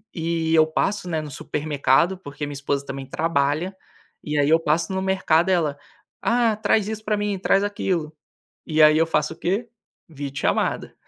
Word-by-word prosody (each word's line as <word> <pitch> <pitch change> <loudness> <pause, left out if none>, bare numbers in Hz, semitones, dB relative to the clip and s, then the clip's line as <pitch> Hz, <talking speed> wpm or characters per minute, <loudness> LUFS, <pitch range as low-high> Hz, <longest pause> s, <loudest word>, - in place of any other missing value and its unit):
eh 165 -1 -1
eu 160 -1 +6
passo, 180 +4 -1
né, 160 -2 -1
no 150 - -7
supermercado, 150 +5 +1
porque 145 -4 -7
minha 145 - -6
esposa 140 0 -2
também 135 -1 -6
trabalha, 155 +4 -1 0.5
e 150 0 -2
aí 145 - +3
eu 160 - +5
passo 165 +3 0
no 190 - -1
mercado 190 -2 +2
ela, 160 -6 +1 0.4
"ah 235 -2 +2
traz 215 -1 +1
isso 220 0 -5
pra 210 -1 +1
mim, 205 -1 -1
traz 195 +1 +2
aquilo", 180 -6 -2 0.5
e 155 -1 +3
aí 155 0 +7
eu 165 - +3
faço 150 -1 0
o - - -22
quê? 200 +7 -1 0.4
O - - -17
vídeo 140 -1 -5
chamada. - - -1
165 Hz, 185 wpm, -23 LUFS, 150-190 Hz, 0.5 s, aí